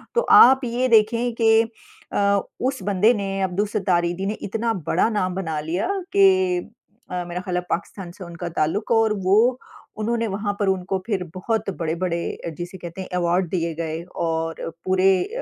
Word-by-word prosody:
तो 475 - +4
आप 265 +2 +8
ये 245 +2 0
देखें 230 +2 +3
कि 225 -1 +5 0.5
अ, 200 0 +2 0.2
उस 260 -3 -1
बंदे 205 +4 +3
ने 195 -3 -3
अब्दुल 190 +3 0
सत्तार 185 -4 +1
ईधी 175 +3 -3
ने 205 - -1
इतना 225 +3 -1
बड़ा - - +3
नाम 185 -4 -1
बना 160 -5 -2
लिया 170 - -2 0.3
कि 375 -2 +4 0.5
अ, 180 -1 -2
मेरा 175 +1 -4
ख्याल 180 -1 -4
है - - 0
पाकिस्तान 180 0 -4
से 185 - -11
उनका 170 0 -6
ताल्लुक 165 +10 0
है 230 - +5
और 220 -1 +3
वो 230 +7 +4 0.4
उन्होंने 230 +1 0
वहाँ 205 0 -2
पर 205 - +1
उनको 190 0 -1
फ़िर 195 -5 -1
बहुत 215 +2 -1
बड़े-बड़े 170 +1 -1 0.2
अ, - - -1
जिसे 175 +3 -7
कहते 175 +2 -7
हैं 185 - -8
अवार्ड 175 0 +1
दिए 170 -3 -1
गए 165 0 -4
और 165 0 -2
पूरे 185 +1 +3
अ - - -6
195 Hz, 185 wpm, -23 LUFS, 175-225 Hz, 0.5 s, आप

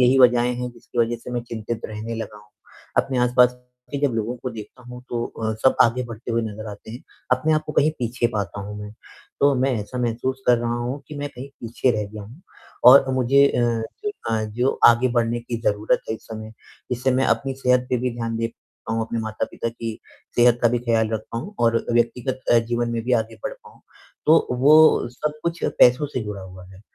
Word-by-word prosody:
यही 125 +2 +5
वज़हें 125 -1 +5
हैं, 125 0 -4
जिसकी 120 0 -10
वजह 120 +1 +1
से - - -7
मैं 120 -1 -2
चिंतित 115 -1 -5
रहने 110 +2 -6
लगा 110 -2 -6
हूँ। 105 0 -20 0.5
अपने 130 -2 -3
आस-पास 125 0 +4 0.4
के 140 - -1
जब 125 - -3
लोगों 115 +2 -2
को 125 +1 -5
देखता 110 +3 -10
हूँ, 125 0 -10
तो 120 -1 -1
अ, 110 -1 -4
सब 130 - +4
आगे 120 +2 +2
बढ़ते 115 0 -7
हुए 115 0 +1
नज़र 110 0 -6
आते 105 +1 -11
हैं, 120 - -9 0.3
अपने 130 +5 +2
आप 155 - +1
को 150 - -4
कहीं 150 +1 +3
पीछे 120 0 0
पाता 100 -1 -3
हूँ 105 +1 -7
मैं। 105 0 -8 0.5
तो 140 0 +5
मैं 130 +1 +1
ऐसा 105 +5 -6
महसूस 125 +2 -2
कर 125 -1 +5
रहा 120 0 -1
हूँ 125 +4 -4
कि 150 - -8
मैं 145 0 -3
कहीं 130 +2 -9
पीछे 120 +2 0
रह 105 -1 -1
गया 105 -1 -7
हूँ, 115 +10 -13 0.4
और 130 +1 +8
मुझे 135 +2 +4
अ, 125 - -1 0.4
जो 415 - 0 0.2
अ, 110 -1 +1
जो 120 +5 -1
आगे 120 +2 +5
बढ़ने 120 0 +1
की 115 -1 -5
ज़रूरत 105 -1 +1
है - - 0
इस - - -13
समय, 110 -1 -7 0.4
जिससे 125 +2 0
मैं 130 +1 +2
अपनी 135 -1 0
सेहत 125 -1 +2
पे 125 - +2
भी 125 +1 -1
ध्यान 115 -1 -3
दे 115 0 -1 0.4
पाऊँ, 115 0 0
अपने 115 +1 -3
माता-पिता 110 +1 -3
की 115 -1 -6 0.4
सेहत 120 0 +5
का 120 - +6
भी 120 +1 0
ख़्याल 115 -2 +1
रख 110 -1 -1
पाऊँ 150 - -5
और 115 -1 +2
व्यक्तिगत 120 +2 0
अ, 120 - +7
जीवन 120 +1 -1
में 115 -1 -2
भी 125 - -1
आगे 110 - -14
बढ़ - - -2
पाऊँ। 465 -2 -16 0.5
तो 160 +1 +5
वो 155 -1 +6
सब 150 +5 -4
कुछ 170 0 -2 0.2
पैसों 125 +4 +6
से 135 -3 -4
जुड़ा 105 -2 -6
हुआ 95 -1 -11
है, 95 0 -15
120 Hz, 220 wpm, -23 LUFS, 115-130 Hz, 0.5 s, और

